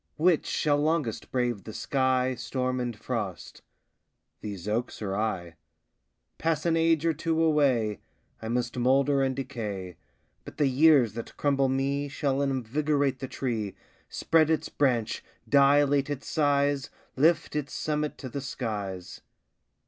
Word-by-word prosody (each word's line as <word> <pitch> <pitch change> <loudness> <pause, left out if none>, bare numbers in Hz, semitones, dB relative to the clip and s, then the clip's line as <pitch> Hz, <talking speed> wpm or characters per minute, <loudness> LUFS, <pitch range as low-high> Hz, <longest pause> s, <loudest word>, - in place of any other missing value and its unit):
Which 165 0 +3
shall 145 -1 +1
longest 150 -6 -1
brave 120 -5 -1
the 110 - -8
sky, 130 -1 +1
Storm 125 +1 -2
and 120 -3 -3
frost 105 -5 -5 0.8
these 100 -3 -7
oaks 115 +4 -2
or 100 -2 -3
I? 90 -6 -2 0.8
Pass 160 -1 0
an 165 -1 +3
age 165 -1 +2
or 165 - +3
two 160 +1 -1
away, 130 - +2 0.4
I 110 - -5
must 120 0 -1
moulder 135 +3 +3
and 130 -1 0
decay, 105 -9 -5 0.5
But - - -11
the 145 - +3
years 135 -4 +5
that 115 0 -8
crumble 140 -2 +2
me 140 +2 0
Shall 140 -1 -1
invigorate 140 +1 0
the 135 - -4
tree, 115 -7 -3 0.3
Spread 160 -1 +2
its 160 -2 0
branch, 125 -6 0 0.2
dilate 140 0 +4
its 145 -1 -4
size, 145 -2 +1 0.3
Lift 155 +3 +2
its 145 -2 -2
summit 150 -1 -2
to 130 - -7
the 140 +3 -4
skies. 100 -8 -5
135 Hz, 140 wpm, -27 LUFS, 115-145 Hz, 0.8 s, years